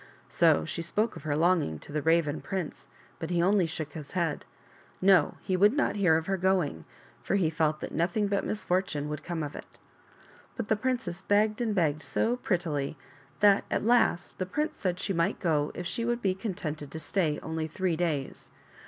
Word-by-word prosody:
So 80 - +4
she 170 - -4
spoke 215 +7 -1
of - - -8
her 145 -1 0
longing 165 - +2
to 145 - -11
the 150 +1 -1
Raven 160 -1 +2
prince, 185 -5 -5 0.3
but 165 - -4
he 175 -1 +1
only 185 0 +3
shook 155 -2 -4
his 150 -3 -8
head. 170 -5 -1 0.5
No; 185 -5 +4
he 185 - -1
would 205 +5 +5
not 290 -5 +1
hear 180 -6 +4
of 160 - -3
her 195 +1 0
going, 180 - 0 0.4
for - - -1
he 175 -5 +2
felt 155 -1 0
that - - -5
nothing 175 +6 +1
but 200 0 0
misfortune 180 -7 -1
would 150 -1 -5
come 170 -2 -3
of 145 - -6
it. - - -11 0.8
But 230 -3 -4
the 220 - +4
princess 210 -6 -2
begged 210 +3 +2
and 220 -3 0
begged 155 -5 +1
so 235 +8 0
prettily 160 - -1 0.4
that 205 -1 +6
at - - -1
last 230 -6 +2
the 185 - -1
prince 300 - -2
said 180 -2 -1
she 195 - -1
might 170 +4 0
go 150 -5 +1
if 180 - -5
she 230 - -2
would 240 +1 -1
be 190 -2 +2
contented 170 -8 -5
to 160 - -6
stay 155 0 0
only 160 0 -3
three 175 +2 -1
days. 155 -5 -2
175 Hz, 195 wpm, -29 LUFS, 155-200 Hz, 0.8 s, that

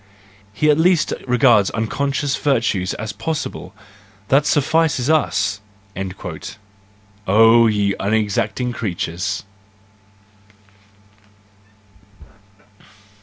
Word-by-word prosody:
He 150 +8 +2
at 150 - +1
least 175 -1 +2
regards 120 -5 +4
unconscious 140 +5 -2
virtues 115 -9 0
as 110 -1 -6
possible—that 105 -4 -4
suffices 150 -2 +1
us! 105 -9 0 1.7
"—Oh, 115 +3 +6
ye 105 -2 +1
unexacting 110 +4 -1
creatures! 90 -3 -3
115 Hz, 65 wpm, -19 LUFS, 100-140 Hz, 1.7 s, Oh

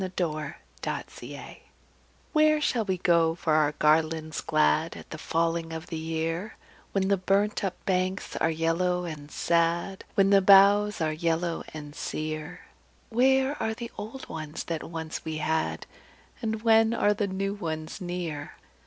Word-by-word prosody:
A 185 - -4
Song 155 -4 -2 0.3
of - - 0 0.2
Autumn - - -9 0.8
"Where 305 -1 +5
shall 240 -6 +1
we 190 -2 0
go 170 -2 +3
for 160 -2 0
our 150 -1 +3
garlands 155 +1 +1
glad 75 0 +2
At - - -12
the - - -6
falling 165 0 0
of 160 0 -5
the - - -2
year, 165 +5 -3 0.3
When 195 -1 +1
the 200 0 +3
burnt 195 +3 +1
up 190 -2 -1
banks 185 0 -1
are 160 - +2
yellow 170 +3 0
and 150 -3 -7
sad, 170 +4 0
When 195 0 +4
the 200 -1 +6
boughs 200 +1 +6
are 155 -1 +1
yellow 165 +1 -1
and 150 -1 -8
sere? 155 +3 -4 0.5
Where 265 +4 +3
are 220 0 -1
the 235 0 -7
old 220 +6 -7
ones 155 -1 -5
that 165 -2 -3
once 160 -1 -5
we 160 -1 -4
had, 160 +1 -1 0.6
And 220 -1 -2
when 225 0 +5
are 210 -2 +3
the 205 0 -1
new 195 +1 -2
ones 160 -2 -5
near? 175 -5 -4
170 Hz, 160 wpm, -27 LUFS, 160-200 Hz, 0.8 s, the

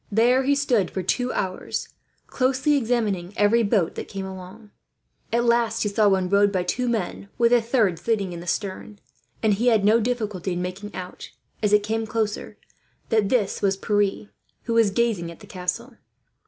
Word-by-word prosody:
There 240 +5 +4
he 285 +1 +3
stood 255 -8 +1
for 190 - -4
two 250 +7 0
hours, 185 -1 -3 0.4
closely 265 +3 +1
examining 220 -8 -1
every 210 +3 +4
boat 200 -6 +1
that - - -6
came 195 -1 -5
along. 190 +3 -10 0.6
At 235 +1 +2
last 235 -1 +2
he 210 - 0
saw 210 +1 +3
one 190 -2 +1
rowed 200 +1 +3
by 185 -2 0
two 245 +7 -1
men, 200 -3 -3
with 235 0 +4
a 240 - +5
third 225 -7 +1
sitting 200 -6 -1
in 170 - -6
the 175 - -10
stern; 200 +3 -3 0.5
and 215 -2 +4
had 220 -1 +2
no 220 +2 +5
difficulty 210 -6 -2
in 175 - -3
making 190 +3 -6
out, 180 0 -8 0.3
as 210 -2 +1
it 210 0 +4
came 220 +1 -2
closer, 215 -1 -3 0.5
that 220 -4 +2
this 230 -6 0
was 195 -1 +1
Pierre, 205 0 0 0.3
who 230 - -2
was 230 -2 +4
gazing 200 -5 0
at 170 - -11
the - - -13
castle. 215 +7 -4
210 Hz, 180 wpm, -24 LUFS, 190-235 Hz, 0.6 s, a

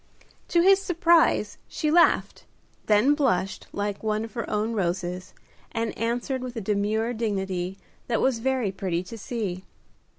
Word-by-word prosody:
To 340 - +3
his 390 +1 +6
surprise, 340 -3 +3
she 305 -2 -1
laughed, 340 +2 +3 0.4
then 215 +7 +5
blushed 200 -10 0
like 205 0 -3
one 215 0 -1
of 225 - -12
her 235 -3 -4
own 215 +2 -1
roses, 180 -2 -2 0.4
and 230 -1 -2
answered 240 +3 -2
with 250 -1 -6
a - - -2
demure 215 +3 0
dignity 195 -5 -2 0.3
that 235 - +1
was 260 -3 +2
very 255 -4 0
pretty 185 -2 -2
to 185 - -9
see. 205 -5 -4
220 Hz, 145 wpm, -26 LUFS, 195-255 Hz, 0.4 s, his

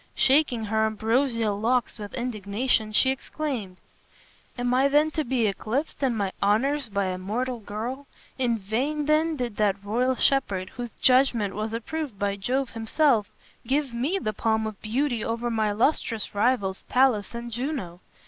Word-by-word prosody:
Shaking 260 -5 +3
her 220 +1 +2
ambrosial 225 -1 0
locks 240 +1 0
with 205 -1 -7
indignation, 220 -1 -1
she 260 +5 +4
exclaimed, 260 -8 -4 0.8
"Am 245 0 0
I 265 +2 +4
then 295 +2 +3
to 310 - -1
be 245 -3 +1
eclipsed 225 +10 -2
in 255 -4 +1
my 200 -2 -1
honors 255 +6 +2
by 200 -1 0
a 185 0 -2
mortal 240 +6 -2
girl? 235 +7 -5 0.3
In 240 -3 +2
vain 260 +9 -1
then 310 +2 +2
did 245 -6 -4
that 200 -2 +1
royal 250 +5 +1
shepherd, 200 -10 +1
whose 240 -1 -7
judgment 250 -6 +4
was 215 +1 -3
approved 250 +1 -4
by 200 0 0
Jove 255 +6 -1
himself, 225 0 +2 0.4
give 275 -1 0
me 270 +11 0
the 215 - -2
palm 220 +1 0
of 215 -2 -6
beauty 240 +1 -1
over 235 +1 -2
my 220 -2 +1
illustrious 225 0 0
rivals, 205 -3 +1
Pallas 250 -5 +2
and 235 0 -6
Juno. 240 - -3
235 Hz, 160 wpm, -26 LUFS, 210-265 Hz, 0.8 s, she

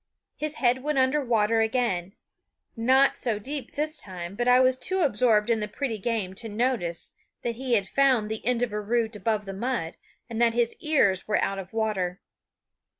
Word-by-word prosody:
His 305 0 -3
head 250 -1 +2
went 300 +1 -1
under 265 +3 +2
water 225 -2 +2
again 220 -6 0 0.6
not 260 +4 +4
so 230 -4 0
deep 265 +3 -5
this 305 +1 -1
time; 180 -2 -7
but 240 +4 -2
I 250 0 +6
was 255 0 +4
too 375 +8 0
absorbed 225 -6 +3
in 225 - +2
the 210 - -2
pretty 225 0 -3
game 210 -3 -2
to 225 - -6
notice 210 -7 -1 0.3
that 235 - -1
he 255 -2 +1
had 200 -3 +1
found 260 -6 +3
the 220 0 -4
end 245 +1 +1
of 230 -4 -2
a 210 - -2
root 225 +1 -1
above 210 +1 -1
the 195 - -6
mud, 205 -5 -3 0.3
and 230 -1 -4
that 230 -1 +3
his 240 -1 +1
ears 230 -12 +2
were 210 - +2
out 195 0 -1
of 190 -1 -8
water. 200 -5 -1
230 Hz, 195 wpm, -26 LUFS, 210-255 Hz, 0.6 s, I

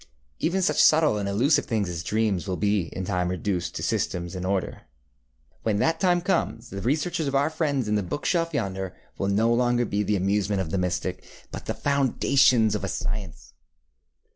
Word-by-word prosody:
Even 190 +3 0
such - - +3
subtle 155 -9 +5
and 100 -1 -2
elusive 125 +10 +2
things 110 -4 0
as 85 -2 -4
dreams 105 -1 0
will 90 -1 -2
in 100 -3 -1
time 90 -2 0
be 90 - -1
reduced 90 0 -2
to - - -4
system 85 -1 -1
and 90 0 -4
order. 95 -1 -2 0.8
When 110 -2 0
that 160 +9 +1
time 175 -2 +3
comes 125 -10 -1
the 100 - -5
researches 150 - 0
of 140 - -1
our 145 +3 +2
friends 145 -7 -1
in 105 - 0
the 105 - +2
book 95 +10 -5
shelf 165 -2 +1
yonder 95 - -3 0.2
will 95 - 0
no 110 +4 +2
longer 120 0 +2
be 105 -1 -1
the 105 +1 0
amusement 100 +1 0
of 85 -4 -3
the 95 - 0
mystic, 90 -1 -2 0.3
but - - -7
the - - -2
foundations 135 -4 +3
of - - -2
a - - -1
science. 100 -1 -5
105 Hz, 190 wpm, -25 LUFS, 95-140 Hz, 0.8 s, subtle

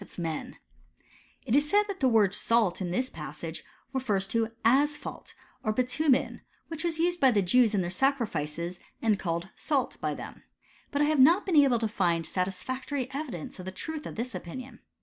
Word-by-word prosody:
of 200 - -13
men"* 165 -3 -4 0.4
— - - -30
^it 230 - +2
is 290 +1 +3
said, 415 +4 +5
that 400 -2 -5
the 265 - +3
word 210 -5 +4
salt 215 -3 +1
in 180 - -2
this 250 +9 0
passage 155 +2 -7 0.3
refers 210 -8 0
to 225 +2 0
asphalt, 290 +5 +1 0.3
or 215 - +1
bitumen, 255 +4 +1 0.3
which 325 -1 -4
was 335 -2 +1
used 350 +1 +1
by 265 - +6
the 205 -5 +2
Jews 220 +3 +4
in 195 - +2
their 175 0 -3
sacrifices, 180 - -1 0.2
and 215 -3 +2
called 170 +1 -2
salt 280 -4 -1
by - - -1
them. - - -9 0.5
But 285 +1 +1
I - - +4
have 305 -1 +2
not 335 +10 +6
been 370 -4 0
able 275 -4 +6
to 225 -1 0
find 170 -5 0
satisfactory 255 - -3
evidence 265 - -5
of 180 - -7
the 190 - -4
truth 315 - -5
of - - -8
this 245 +3 -4
opinion. 255 +9 -7
235 Hz, 190 wpm, -28 LUFS, 185-280 Hz, 0.5 s, by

